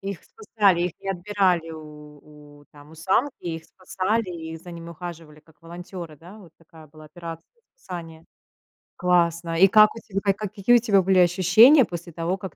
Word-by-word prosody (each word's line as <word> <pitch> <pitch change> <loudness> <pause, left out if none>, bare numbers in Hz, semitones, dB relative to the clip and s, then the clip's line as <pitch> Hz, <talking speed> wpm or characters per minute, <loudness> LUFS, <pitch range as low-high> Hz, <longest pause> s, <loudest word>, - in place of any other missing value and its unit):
Их 195 -2 -5
спасали, 210 - 0
их 175 -2 -2
не 195 - -8
отбирали 185 -3 0
у 150 -1 -14
у, 145 - -20
там, 145 0 -16
у - - -14
самки, 195 - 0
их 165 -2 -5
спасали, 190 +4 -3
и 160 -2 -7
за 175 +2 -12
ними 170 0 -9
ухаживали 165 -2 -10
как 155 0 -27
волонтёры, 170 -1 -9
да? 180 +8 -14
Вот 185 -6 -16
такая 160 -1 -17
была 155 +1 -16
операция 165 +1 -10 0.3
спасения. 165 - -10 0.7
Классно. 170 -2 +1
И 195 +3 +7
как 215 +2 +5
у - - -8
тебя 195 -2 -5
ка 200 -1 +1 0.2
какие 210 +4 +2
у - - +6
тебя 210 -4 +3
были 190 0 +2
ощущения 190 - +6
после 175 -1 -8
того, 170 +3 -2
как 190 -1 -9
175 Hz, 180 wpm, -23 LUFS, 160-195 Hz, 0.7 s, И